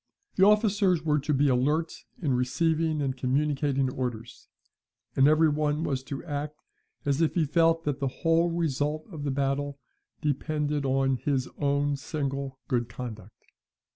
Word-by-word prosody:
The 190 +1 +6
officers 205 -5 +3
were 150 -1 +3
to 145 +2 -2
be 145 0 +3
alert 145 +6 +1 0.3
in 150 -7 0
receiving 155 +4 +1
and 130 -2 -1
communicating 135 +1 0
orders; 120 -3 -5 0.7
and 135 +1 +5
every 155 +1 +5
one 150 +1 0
was 135 -5 -1
to 140 -1 -6
act 150 -1 -5 0.5
as 140 +2 +1
if 165 - +1
he 165 -3 +3
felt 165 +2 +3
that 145 -3 -2
the 140 - 0
whole 165 +5 +1
result 155 -2 -1
of 150 -4 -6
the - - 0
battle 140 +1 -1 0.4
depended 150 0 -1
on 135 0 +2
his 130 +1 -1
own 145 0 +1
single 135 -2 -4
good 120 -4 0
conduct. 110 -3 -9
145 Hz, 150 wpm, -27 LUFS, 135-155 Hz, 0.7 s, The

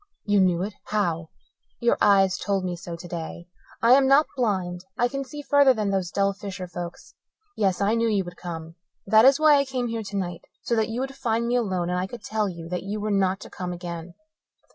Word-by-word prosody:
"You 205 -1 +3
knew 180 -1 +2
it? 205 +1 -4
How?" 170 -6 -1 0.5
"Your 235 - +3
eyes 195 -2 +4
told 195 -2 -1
me 180 -1 -2
so 170 -1 -7
today. 170 0 -7 0.4
I 230 - +6
am 265 +1 +6
not 280 +3 +6
blind 185 -8 -1
I 240 - +3
can 275 +2 -4
see 290 +2 -8
further 285 -2 +5
than 210 -2 -1
those 190 -3 -1
dull 200 +1 +1
fisher 195 -2 -7
folks. 175 0 -8 0.4
Yes, 195 -3 +1
I 200 +2 +2
knew 230 0 +2
you 205 -3 +1
would 175 0 -9
come. 165 -2 -7 0.3
That 220 +3 +6
is 270 +2 +6
why 305 -2 +6
I 280 - +3
came 255 -3 -2
here 230 0 -3
tonight 195 -4 -4 0.2
so 235 - 0
that 220 -1 +1
you 235 +3 -2
would 270 +1 -4
find 235 -3 -1
me 240 +1 0
alone 185 -7 0
and 180 - 0
I 185 - -2
could 235 +1 -10
tell 215 -2 -1
you 170 -2 -8
that 180 0 -2
you 205 +2 -4
were 210 +1 -2
not 195 -1 +1
to - - -10
come 180 -1 -5
again." 175 -1 -7
200 Hz, 225 wpm, -25 LUFS, 180-235 Hz, 0.5 s, I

